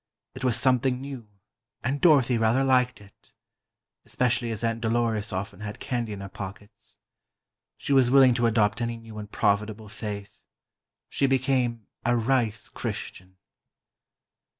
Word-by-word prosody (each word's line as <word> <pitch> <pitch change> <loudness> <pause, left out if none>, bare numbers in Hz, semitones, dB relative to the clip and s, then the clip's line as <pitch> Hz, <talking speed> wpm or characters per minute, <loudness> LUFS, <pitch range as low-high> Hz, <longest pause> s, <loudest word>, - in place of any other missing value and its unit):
It 130 - -9
was 125 -3 +1
something 130 -1 +2
new, 135 -4 -8 0.6
and 135 +2 -1
Dorothy 135 -7 +5
rather 115 +4 +3
liked 125 -3 +2
it. 100 -1 -20 0.7
Especially 120 -1 0
as 115 0 -4
Aunt 115 0 -1
Dolores 110 -2 0
often 95 0 -4
had 105 -1 -7
candy 120 -3 -3
in 100 -1 -6
her 100 - -6
pockets. 100 +2 -10 0.8
She 140 - -2
was 130 -3 +5
willing 130 -1 +6
to 120 -1 +2
adopt 110 0 +2
any 115 0 -2
new 115 -2 -10
and 105 0 -9
profitable 105 +1 0
faith. 105 -1 -7 0.7
She 140 - +1
became 130 -4 +1 0.2
a 120 0 +2
"rice 115 -3 0
Christian." 95 +1 -7
115 Hz, 140 wpm, -26 LUFS, 105-125 Hz, 0.8 s, willing